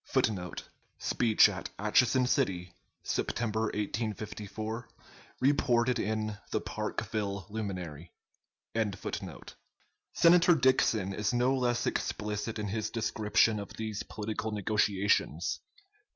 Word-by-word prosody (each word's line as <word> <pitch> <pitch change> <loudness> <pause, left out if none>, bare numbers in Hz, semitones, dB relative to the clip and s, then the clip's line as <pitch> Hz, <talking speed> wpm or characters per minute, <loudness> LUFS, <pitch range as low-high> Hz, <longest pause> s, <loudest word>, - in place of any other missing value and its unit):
[Footnote: 90 -5 -1 0.3
Speech 115 -3 +4
at - - -5
Atchison 125 +5 +3
City, 90 -10 0 0.3
September, 110 -1 -1
1854, 110 +1 -4 0.5
reported 125 -3 +3
in 110 -1 -2
the - - 0
"Parkville 100 -3 -3
Luminary."] 90 -7 -5 2.0
Senator 170 0 +6
Dixon 115 -8 +3
is 105 +4 -1
no 125 +2 +3
less 120 -2 +1
explicit 105 +2 -2
in 105 -1 -3
his 110 +2 -2
description 110 -1 +2
of 100 - -7
these 110 -2 -4
political 110 +1 -4
negotiations. 100 -4 +1
110 Hz, 95 wpm, -31 LUFS, 100-120 Hz, 2.0 s, Senator